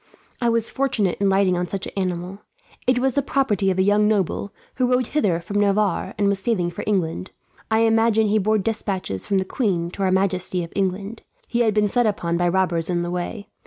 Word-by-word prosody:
I 240 - +2
was 230 -1 0
fortunate 240 -9 0
in 200 - +3
lighting 190 -1 +3
on 175 0 -1
such 195 +1 -4
an - - -8
animal. 185 +1 -3 0.5
It 255 0 +3
was 260 +1 +1
the 280 - +2
property 240 -8 +1
of 185 - 0
a 190 - +3
young 205 +1 +3
noble, 200 -1 0 0.3
who 255 -1 +2
rode 250 0 +2
hither 205 - 0
from 200 +4 -3
Navarre 205 -2 +1
and 205 -1 +2
was 200 -1 +2
sailing 190 -4 0
for 175 - -6
England. 185 -3 -1 0.4
I 220 0 +3
imagine 225 -1 +3
he 215 +1 +2
bore 215 +2 +2
despatches 195 - -3
from 195 - +1
the 190 - 0
queen 180 -6 -1
to 195 - -7
her 190 -1 +2
majesty 185 -1 +1
of 165 - -9
England. 195 +3 -2 0.3
He 240 - -1
had 220 -3 +2
been 210 -1 +3
set 240 +2 +2
upon 170 -5 -1
by 175 +1 +1
robbers 180 -2 0
on 175 -1 0
the 175 0 -3
way. 190 +4 -4
200 Hz, 220 wpm, -22 LUFS, 185-220 Hz, 0.5 s, in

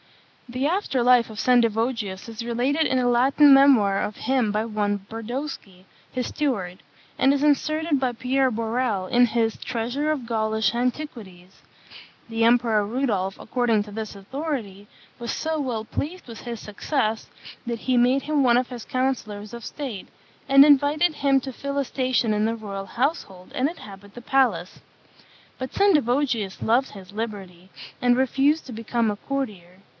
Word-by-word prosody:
The 255 +3 -2
after 330 -7 0
life 245 -1 +4
of 215 - -10
Sendivogius 230 -4 +1
is 230 0 -6
related 250 +7 0
in 260 - +1
a 250 - +1
Latin 270 +4 +5
memoir 255 -8 +5
of 210 - -4
him 255 -5 0
by 215 +1 -1
one 205 -3 -2
Brodowski, 225 -5 -6 0.3
his 250 -1 -3
steward; 200 -12 -3 0.3
and 270 +1 +4
is 280 - -1
inserted 305 0 +1
by 255 -2 +1
Pierre 255 +2 +1
Borel 225 -3 -1
in 245 +5 +4
his 225 0 0
Treasure 250 +6 -2
of 280 -6 -3
Gaulish 220 -2 0
Antiquities. 235 -8 -5 0.7
The 225 0 -1
Emperor 230 -3 +3
Rudolph, 205 -5 -1
according 230 -3 0
to 210 - -12
this 215 0 -5
authority, 210 -2 -5 0.3
was 235 -1 -4
so 320 0 -2
well 245 -7 -3
pleased 335 +9 -5
with 230 -2 -9
his 235 -2 -6
success, 220 +1 -2 0.4
that 235 -1 -4
he 255 - 0
made 250 +3 +3
him 300 -2 +1
one 240 -2 +5
of 250 0 0
his 245 -3 -7
councillors 235 -5 -3
of 235 -1 -8
state, 255 -9 -6 0.4
and 275 +1 +8
invited 295 +3 +4
him 275 -2 +2
to 265 0 -7
fill 280 +3 -5
a 280 - +1
station 255 -4 0
in 210 0 +1
the 225 +1 0
royal 200 -3 -6
household 230 - -3
and 265 +3 +1
inhabit 200 - -12
the 240 - -8
palace. 265 +1 +1 0.8
But 260 0 -5
Sendivogius 265 - +1
loved 245 +4 +2
his 195 -1 -12
liberty, 195 -5 -6 0.3
and 245 0 +3
refused 275 +4 +2
to 255 - -8
become 230 0 -1
a - - -3
courtier. 205 -9 -5
240 Hz, 160 wpm, -24 LUFS, 215-270 Hz, 0.8 s, and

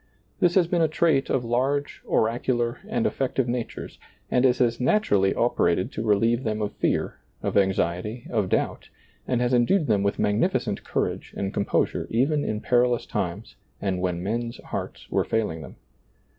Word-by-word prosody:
This 175 -1 +3
has 185 -3 +5
been 170 0 0
a 160 - +4
trait 155 -3 +2
of 125 -3 0
large, 135 +5 -1
oracular, 120 +1 0
and 225 +1 -1
effective 135 - 0
natures, 120 -1 -4 0.3
and 125 +1 +4
it 125 - +2
has 120 -1 +1
naturally 105 - +2
operated 95 -7 +1
to 110 - -4
relieve 115 +3 +2
them 110 -1 -1
of 105 -1 -2
fear, - - -1 0.2
of - - -2
anxiety, 95 +3 0
of 105 -5 0
doubt, - - -1 0.4
and 125 -2 +1
has 125 +1 +1
en 120 -1 +4
dued 195 -5 +3
them 105 -6 +2
with 100 +1 0
magnificent 105 0 0
courage - - -3
and 95 0 -2
com 100 - 0
posure - - 0
even 145 +6 +1
in 110 0 -2
perilous 120 -1 +2
times - - -4 0.2
and 95 -2 -1
when 90 -1 -1
men's 115 +4 -2
hearts - - -5
were - - +2
failing 105 -8 -1
them. 70 - -10
120 Hz, 170 wpm, -25 LUFS, 105-130 Hz, 0.4 s, has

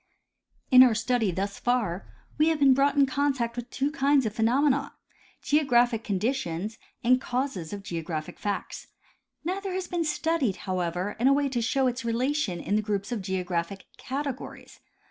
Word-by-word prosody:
In 255 0 +9
our 250 -3 +6
study 230 -1 +1
thus 195 +3 -3
far 215 -7 -1 0.3
we 305 - +5
have 320 - +1
been 280 -2 +6
brought 275 +2 +2
in 280 -1 +5
contact 265 -4 -1
with 245 0 -6
two 280 +3 -1
kinds 280 -3 +2
of 215 - -2
phenomena, 260 +5 +1 0.5
geographic 245 -6 +3
conditions 210 -2 -2 0.2
and 255 +2 +4
causes 245 - -3
of 200 -1 -6
geographic 165 -4 -5
facts. 205 -1 -4 0.6
Neither 380 +3 -3
has 370 -1 -3
been 350 -2 -1
studied, 305 - 0
however, 180 +1 -2
in 245 - +3
a 275 - +6
way 285 0 +2
to 245 -3 -1
show 265 +3 +1
its 250 0 -1
relation 235 - -1
in 200 - -1
the 215 - +2
groups 205 0 -3
of 235 -4 -2
geographic 185 0 -3
categories. 270 -1 -6
245 Hz, 165 wpm, -27 LUFS, 200-275 Hz, 0.6 s, In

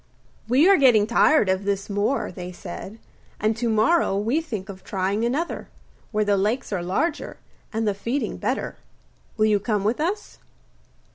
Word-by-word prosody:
'We 265 +8 +5
are 395 -1 +7
getting 245 -7 +5
tired 235 +2 +4
of 190 +1 +1
this 200 -1 -1
moor,' 205 +7 -1
they 180 0 -7
said, 185 +4 -8 0.4
'and 215 +1 +1
to 235 +1 0
morrow 220 - +3
we 230 +10 +1
think 215 - -6
of 190 -1 -10
trying 195 +2 -1
another, 285 +9 -2 0.4
where 215 -1 +1
the 205 -1 +2
lakes 215 +4 -1
are 185 - -1
larger 285 - -2 0.3
and 225 -1 -1
the 205 - +2
feeding 235 +8 -3
better. - - -2 0.6
Will 215 - +3
you 210 -1 +3
come 210 -1 -1
with 220 +6 0
us? 375 +7 -3
215 Hz, 165 wpm, -24 LUFS, 200-255 Hz, 0.6 s, are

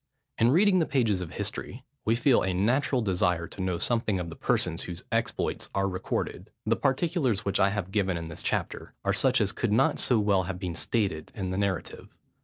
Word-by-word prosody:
In 115 - +5
reading 185 +6 +5
the 160 - +1
pages 115 -9 +1
of 85 - -6
history, - - -4 0.2
we 115 - +3
feel 125 +1 +4
a 95 -1 0
natural 125 +5 +2
desire 90 -3 +1
to 95 - -7
know 90 -2 0
something 110 -2 0
of 85 -1 -4
the 80 - -8
persons, 85 -2 0
whose 85 -2 -6
exploits - - -1
are 100 0 +2
recorded. 90 -1 -3 0.2
The 115 +1 +2
particulars, 135 - 0
which 100 0 0
I 95 - +5
have 100 -2 -3
given 95 -3 +1
in 85 -1 -5
this 80 - -7
chapter, - - -3
are - - +2
such - - +3
as - - +1
could - - -1
not - - +3
so 120 - +3
well 100 -3 +3
have 95 0 -4
been 90 -2 -4
stated 95 -5 -1
in 95 -3 -3
the 95 - -2
narrative. 100 -4 -3
100 Hz, 205 wpm, -28 LUFS, 90-115 Hz, 0.2 s, In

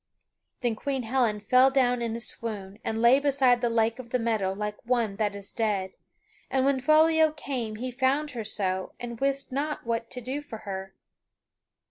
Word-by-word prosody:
Then 240 -3 0
Queen 270 +2 -2
Helen 230 -3 +1
fell 255 +6 +5
down 250 -2 +2
in 230 -1 -2
a - - -4
swoon, 210 -4 -6
and 225 +1 -2
lay 245 +3 +7
beside 270 -4 +3
the 240 - +2
lake 230 +1 +1
of 245 -2 -8
the 250 - +1
meadow 220 -5 0
like 210 +1 -5
one 235 -5 0
that 205 -1 0
is 200 -1 -7
dead; 205 -4 -1 0.6
and 265 0 +1
when 275 -1 +2
Foliot 315 +2 +4
came 245 -7 -4
he 250 +4 -4
found 275 +4 +1
her 235 -3 -4
so 190 -3 -2
and 235 -1 -6
wist 275 0 0
not 290 +2 -2
what 230 0 -2
to 250 - -7
do 260 +4 -4
for 225 -7 -9
her. 190 -1 -6
235 Hz, 185 wpm, -27 LUFS, 215-265 Hz, 0.6 s, lay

